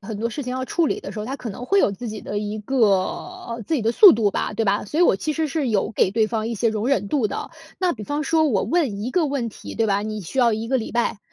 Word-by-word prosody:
很 205 +1 -6
多 230 +2 -1
事 290 - -5
情 250 - -5
要 260 0 -2
处 335 +4 +1
理 400 - -1
的 - - -7
时 215 - -7
候， 210 - -4
他 270 +3 -4
可 235 - -6
能 245 +5 -8
会 395 - +3
有 210 - +4
自 230 +4 -6
己 215 -1 -7
的 205 - -3
一 210 +1 -4
个 270 +6 -4
呃， 230 - -2
自 325 - 0
己 260 - 0
的 225 +2 +1
速 405 - +9
度 215 -2 +2
吧， 210 - -2
对 225 - 0
吧？ 205 +1 0
所 305 - -3
以 - - +5
我 340 - +5
其 305 +8 -3
实 320 -1 0
是 275 -3 -1
有 210 -1 0
给 190 - +2
对 220 +1 +2
方 220 0 -2
一 235 - -2
些 225 +2 +1
容 220 +2 -2
忍 205 -8 +1
度 260 -4 +1
的。 - - -5 0.3
那 365 -2 +1
比 215 - -8
方 290 +7 -2
说 315 +2 +2
我 205 -7 +1
问 265 -13 0
1 245 - -3
个 340 0 +2
问 270 -5 -2
题， - - -10
对 225 - +1
吧， 200 -1 +1
你 215 -1 -4
需 225 +10 -6
要 235 -3 +4
1 220 +1 -4
个 260 +1 +1
礼 220 - -5
拜。 235 -3 0
230 Hz, 330 characters per minute, -22 LUFS, 210-280 Hz, 0.3 s, 速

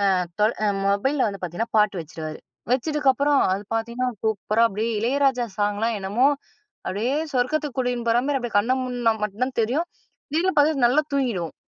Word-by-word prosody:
அ - - +2 0.2
தொ 210 - +6 0.2
அ - - +3 0.2
மொபைல்ல 240 +6 +1
வந்து 200 -2 -7
பார்த்தீங்கன்னா 180 +7 -4
பாட்டு 205 -3 +2
வச்சுருவாரு. 155 -1 -7 0.3
வச்சதுக்கப்புறம் 285 0 +2
அது 200 - -3
பார்த்தீங்கன்னா, 235 +3 -1
சூப்பரா 220 +1 +1
அப்பிடியே 220 +2 -2
இளையராஜா 255 +1 +1
சாங்லாம் 210 +2 0
என்னமோ, 205 +7 +2 0.6
அப்பிடியே 225 +9 -1 0.2
சொர்க்கத்துக்கு 275 +2 0
கூடின்னு 245 -2 -1
போறமாரி 265 +4 +2
அப்பிடியே 235 -4 -3
கண்ண 235 +5 +2
மூட்னா 245 -3 0
மட்டும் 210 +4 -1
தான் 260 - -7
தெரியும். 290 +10 -1 0.4
திடீர்னு 350 +4 +1
பார்த்தா 290 -3 +3
நல்லா 285 +5 +3
தூங்கிடுவோம். 225 - -1
240 Hz, 155 wpm, -24 LUFS, 210-270 Hz, 0.6 s, தொ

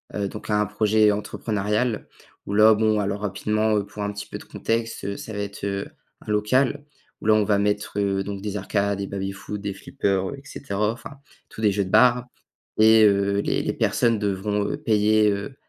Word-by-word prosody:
Heu, 100 -1 -1
donc 105 - -9
un 105 0 +2
projet 105 +1 +3
entrepreneurial 105 +2 -2 0.4
où 100 - -3
là, 110 +1 +7
bon 110 0 +2
alors 100 0 -2
rapidement, 105 +2 0
heu, 100 - -1
pour 105 +1 -7
un 100 - -2
petit 105 0 -7
peu - - -6
de - - -12
contexte, 115 -2 -3
heu, 100 - -3
ça - - -8
va 105 - -4
être, 100 -1 -6
heu, 100 0 -3 0.4
un - - -2
local 130 +7 +1 0.4
où - - -5
là 110 - +6
on 110 - +3
va 100 -1 +2
mettre, 105 0 -1
heu, 100 -1 0
donc 100 -1 -5
des 105 0 -4
arcades, 100 0 -1
des 100 - -3
baby-foot, 100 +1 -5
des 100 -1 -3
flippers, 95 0 -2
heu - - -6
et 135 - -14
cetera. 105 -6 -2
Enfin 115 - -9 0.4
tous - - -10
des 105 -2 +4
jeux 100 0 0
de - - -7
bar 120 +2 +5 0.5
et 110 0 +6
heu, 100 0 +2
les - - -1
les - - -1
personnes 115 -3 +1
devront, 100 +1 -1
heu, - - -2
payer, 110 -5 +3
heu, 100 +7 -4
105 Hz, 210 wpm, -24 LUFS, 100-110 Hz, 0.5 s, là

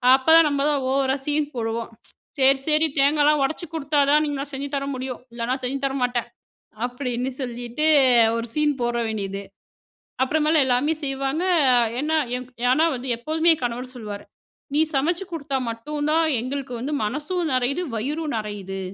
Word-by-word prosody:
அப்பதான் 320 +4 +6
நம்ம 280 -1 -1
தான் 285 -3 0
ஓவரா 265 0 +2
சீன் 295 0 0
போடுவோம், 230 -1 -3 0.5
"சரி, 270 0 +5
சரி 310 +1 +4
தேங்காலா 295 +2 +4
ஒடச்சி 315 +5 -2
கொடுத்தா 295 -1 0
தான் 300 +1 +4
என்னால 280 0 -4
செஞ்சு 275 +1 -4
தர 275 - -3
முடியும் 255 -1 -5
இல்லைனா 235 +1 -2
செஞ்சு 265 +2 -2
தர 270 - -1 0.6
மாட்டேன்."அப்படின்னு 245 +2 -4
சொல்லிட்டு 245 +3 -3 0.5
ஒரு 230 - -3
சீன் 300 -1 +2
போட 240 0 0
வேண்டியது. 200 -2 -3 0.8
அப்புறமேல் 305 +2 +3
எல்லாமே 260 +5 +2
செய்வாங்க, 275 +4 -1 0.6
ஏன்னா 310 +2 0 0.5
ஏன்னா 290 +6 +4
வந்து 250 +2 -7
எப்போதுமே 315 +7 +1
என் 295 - -12
கணவர் 245 +1 -4
சொல்லுவாரு, 210 -4 -7 0.5
"நீ 300 - +3
சமைச்சு 335 +8 0
கொடுத்தா 280 -4 -2
மட்டும் 290 +6 -4
தான் 325 +1 +3 0.2
எங்களுக்கு 260 0 -4
வந்து 285 +5 -3
மனசும் 300 - -2
நெறையுது, 255 +6 0
வயிறும் 295 +6 -2
நெறையுது." 200 -3 -5
275 Hz, 145 wpm, -23 LUFS, 245-300 Hz, 0.8 s, அப்பதான்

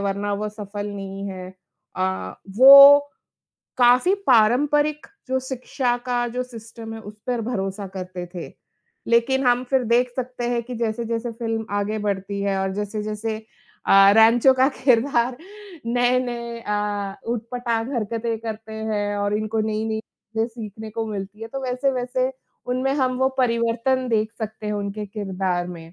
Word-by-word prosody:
वरना 200 +1 -1
वो 210 +1 -3
सफल 205 -1 -6
नहीं 195 0 -6
है। 185 -1 -7 0.5
अ, 185 - -2 0.2
वो 280 +2 +11 0.8
काफ़ी 250 +10 +5
पारंपरिक 290 +6 +3 0.2
जो 260 0 +1
शिक्षा 255 -1 -2
का 245 -1 0
जो 250 +2 -3
सिस्टम 225 -1 -10
है 225 - -8
उस 210 0 -11
पर 245 -2 -1
भरोसा 195 -3 -3
करते 180 -1 -6
थे, 175 - -6 0.6
लेकिन 250 +3 +2
हम 245 +1 +3
फिर 260 -2 +2
देख 240 +2 +2
सकते 250 -1 -4
हैं 235 -1 0
कि 250 0 -7
जैसे-जैसे 230 +1 -2
फ़िल्म 225 -1 -3
आगे 210 +2 -2
बढ़ती 200 -1 -3
है 195 -1 0
और 190 0 -1
जैसे-जैसे 210 +1 -3 0.5
अ, 195 0 +7
रैनचो 230 +4 +6
का 260 +1 +4 0.2
किरदार 245 -1 +3 0.5
नए-नए 245 -1 0
अ, 205 -2 -2 0.2
उट-पटाँग 235 +1 -3
हरकतें 230 0 -2
करते 220 -1 -7
हैं 210 -2 -2
और 205 0 0
इनको 215 +1 -1
नई-नई 220 0 -1
चीजें 225 +1 -5
सीखने 220 -2 -8
को 225 0 -3
मिलती 210 +1 -6
है, 225 - -6
तो 270 +2 -6
वैसे-वैसे 255 0 -1 0.3
उनमें 255 +2 0
हम 260 -3 +1
वो 265 - +3
परिवर्तन 240 +1 +1
देख 220 -1 0
सकते 220 -1 -6
हैं 210 - -1
उनके 205 +1 -4
किरदार 190 -3 -2
में। 165 -1 -10
225 Hz, 150 wpm, -23 LUFS, 205-245 Hz, 0.8 s, वो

